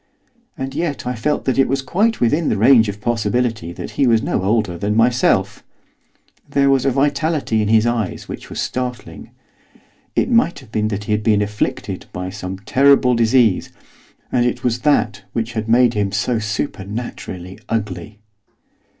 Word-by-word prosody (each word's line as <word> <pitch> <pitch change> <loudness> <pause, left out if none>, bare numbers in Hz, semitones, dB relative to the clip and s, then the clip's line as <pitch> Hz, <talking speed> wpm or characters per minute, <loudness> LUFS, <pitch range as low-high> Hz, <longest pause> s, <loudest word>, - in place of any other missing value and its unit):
And 135 0 -4
yet 160 -7 -3
I 125 - -1
felt 145 +6 -1
that 130 0 0
it 135 - +4
was 135 +1 -1
quite 210 - +1
within 145 +7 +2
the - - 0
range 115 0 +5
of 100 0 -6
possibility 115 -4 -1
that - - -7
he 135 - +1
was 115 -1 +3
no - - -1
older 105 -2 0
than 100 +5 -2
myself, 115 -5 +2 0.9
there 140 -1 +3
was 135 0 +2
a - - +5
vitality 140 -3 0
in 105 - 0
his 110 +1 +4
eyes 120 -5 -2
which - - -8
was - - -6
startling. 125 0 -4 0.9
It - - +1
might 230 -7 +3
have - - -14
been 110 -1 0
that 105 -1 -3
he 105 - -5
had 105 0 +1
been 105 -2 +2
afflicted 105 +1 -3
by 90 +1 -5
some 95 -1 -6
terrible 130 +5 +4
disease, 115 -3 +3 0.6
and 120 - +2
it 125 +1 -1
was 125 -1 0
that 115 -7 +1
which 115 0 -2
had 110 -1 -3
made 120 0 +4
him 100 -2 -1
so 110 +3 0
supernaturally 105 -4 -5
ugly. 105 -2 -3
115 Hz, 170 wpm, -19 LUFS, 105-130 Hz, 0.9 s, range